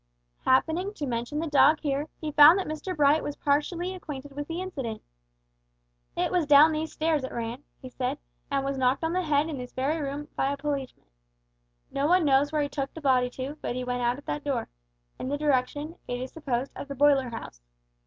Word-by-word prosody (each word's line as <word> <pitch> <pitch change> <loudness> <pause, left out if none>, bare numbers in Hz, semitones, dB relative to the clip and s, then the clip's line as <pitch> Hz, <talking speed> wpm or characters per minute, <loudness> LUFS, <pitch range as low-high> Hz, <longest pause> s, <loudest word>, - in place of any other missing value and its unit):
Happening 330 +10 +2
to 295 - -3
mention 240 +3 -3
the 320 - -1
dog 295 0 +5
here, 285 0 -1
he 310 -1 -4
found 300 +4 +8
that 385 - -1
Mr 310 +4 -4
Bright 295 +1 +4
was 290 - -4
partially 335 +5 0
acquainted 290 -6 -8
with 290 +1 -6
the 330 +1 -4
incident. 270 -12 -5 1.1
"It - - 0
was 350 -5 +1
down 295 +2 +8
these 315 +1 -2
stairs 310 -3 0
it 260 - -4
ran," 235 +2 -4 0.2
he 255 - -7
said, 255 +3 -2 0.3
"and 275 -1 0
was 275 -1 -2
knocked 260 +3 +2
on 325 +1 0
the 370 - +1
head 300 -2 +1
in 300 -5 -5
this 250 0 -8
very 290 +5 -1
room 285 +1 -4
by 270 - +1
the 280 - -2
policeman. 280 -2 -4 0.9
No 280 +1 0
one 360 0 +4
knows 280 +1 +3
where 305 -1 +1
he - - -1
took 275 -1 -4
the - - -6
body 255 -4 +2
to, 270 +4 -6
but - - -3
he 255 - -3
went 245 0 -2
out 240 +1 +1
at 285 - -13
that 295 - -3
door, 280 -3 -2 0.5
in - - -4
the 285 - -1
direction, 290 +2 0
it 245 0 -3
is 255 +1 -5
supposed, 270 -4 -3
of - - -7
the 280 - -6
boiler 275 -2 +4
house." 225 - -8
285 Hz, 215 wpm, -27 LUFS, 260-310 Hz, 1.1 s, found